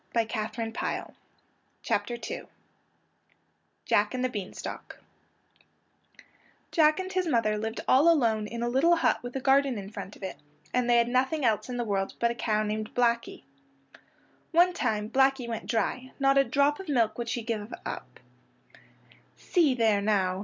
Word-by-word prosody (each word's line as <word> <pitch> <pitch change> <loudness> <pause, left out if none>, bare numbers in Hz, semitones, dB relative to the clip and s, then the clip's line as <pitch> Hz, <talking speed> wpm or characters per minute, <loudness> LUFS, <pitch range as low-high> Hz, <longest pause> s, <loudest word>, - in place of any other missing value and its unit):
[Illustration: 225 0 -2
Jack - - -4
and - - 0
the - - -3
Bean - - -16 0.4
Stalk] 235 -2 -4 1.4
JACK 210 +3 +2
AND 255 - -2
THE 255 - +1
BEAN 205 -6 -5
STALK - - -8 1.7
Jack 310 0 +4
and 375 0 -5
his 370 -1 0
mother 230 -7 +2
lived 220 +2 -4
all 285 +6 +5
alone 225 -9 +1
in 235 +2 -5
a - - 0
little 275 +8 +4
hut 330 - +2
with 245 +1 -8
a - - 0
garden 270 -1 +3
in 200 0 -7
front 200 -1 -8
of - - -15
it, 190 - -5 0.4
and 245 -1 +1
they 240 - +5
had 235 0 +3
nothing 260 +4 +1
else 220 +2 +1
in 245 - -3
the 240 - 0
world 195 -3 -2
but 235 0 +2
a - - -2
cow 215 -3 0
named 215 +1 -4
Blackey. 235 -1 0 1.1
One 350 +2 +4
time 215 -9 -1
Blackey 265 +1 +2
went 230 -1 -5
dry; 255 +2 -2
not 275 0 +3
a 275 - +6
drop 285 +1 +1
of 380 -4 -8
milk 235 -5 +1
would 235 -1 -3
she 235 - -2
give. 220 -1 -4 1.7
"See 320 -8 +2
there 220 -4 +2
now!" 190 -3 +1
235 Hz, 170 wpm, -28 LUFS, 215-270 Hz, 1.7 s, a